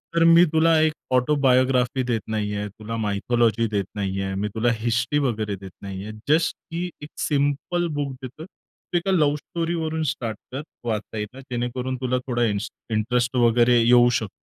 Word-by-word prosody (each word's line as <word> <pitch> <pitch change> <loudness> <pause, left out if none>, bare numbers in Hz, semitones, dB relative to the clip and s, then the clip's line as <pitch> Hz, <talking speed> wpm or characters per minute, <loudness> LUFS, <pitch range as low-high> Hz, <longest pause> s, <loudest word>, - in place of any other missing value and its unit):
तर 165 - +4
मी 165 +1 +7
तुला 160 0 +4
एक 155 0 +3 0.2
ऑटोबायोग्राफी 130 -1 +3
देत 120 -3 -1
नाहीये, 105 -1 -2
तुला 110 +3 -7
मायथॉलॉजी 115 +2 +1
देत 100 -2 0
नाहीये, 95 -1 -2
मी 100 +2 -1
तुला 120 +2 +2
हिस्ट्री 120 +5 0
वगैरे 110 -7 -1
देत 95 0 -10
नाहीये. 100 +1 -6 0.2
जस्ट 160 +2 +3 0.2
की 170 +2 -2 0.2
एक 150 - -8
सिंपल 145 +4 0
बुक 140 -2 -2
देतोय, 130 +5 -8
तू 180 - -7
एका 175 +3 0
लव्ह 150 -5 +3
स्टोरीवरून 160 0 -2
स्टार्ट 110 -3 -5
कर 135 +3 -4 0.3
वाचायला 110 +2 -4
जेणेकरून 125 0 -3
तुला 125 0 +1
थोडा 120 -2 0
इन्स 105 +1 -1 0.2
इंटरेस्ट 120 +3 0
वगैरे 120 0 +4
येऊ 120 +1 +6
शकतो. 110 -4 -2
120 Hz, 155 wpm, -24 LUFS, 110-145 Hz, 0.3 s, मी